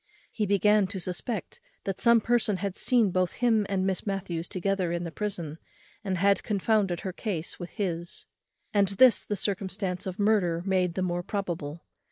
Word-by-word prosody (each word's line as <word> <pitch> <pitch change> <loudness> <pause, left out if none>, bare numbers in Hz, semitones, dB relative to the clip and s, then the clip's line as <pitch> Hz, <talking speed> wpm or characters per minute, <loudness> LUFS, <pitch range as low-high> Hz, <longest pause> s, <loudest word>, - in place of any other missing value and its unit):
He 210 -2 -1
began 205 +1 +4
to 190 0 -4
suspect 185 +6 -4 0.2
that 195 -2 -3
some 235 -1 +6
person 225 -3 +1
had 195 -1 -3
seen 235 -6 +3
both 185 -1 +1
him 225 -4 +2
and 190 -1 0
Miss 190 -1 -1
Matthews 175 -4 -3
together 185 -1 -1
in 170 0 -2
the 170 - -5
prison, 170 -6 -4 0.4
and 190 -3 -1
had 200 +2 +3
confounded 200 -3 +1
her 190 - -4
case 180 -7 -4
with 175 -1 -6
his; 170 -4 -3 0.5
and 200 -2 +4
this 220 +5 +5
the 205 - -2
circumstance 190 -1 -2
of 185 0 -4
murder 200 -6 +2
made 185 -3 +1
the 185 - 0
more 175 -1 -1
probable. 170 -5 -4
195 Hz, 175 wpm, -28 LUFS, 175-205 Hz, 0.5 s, some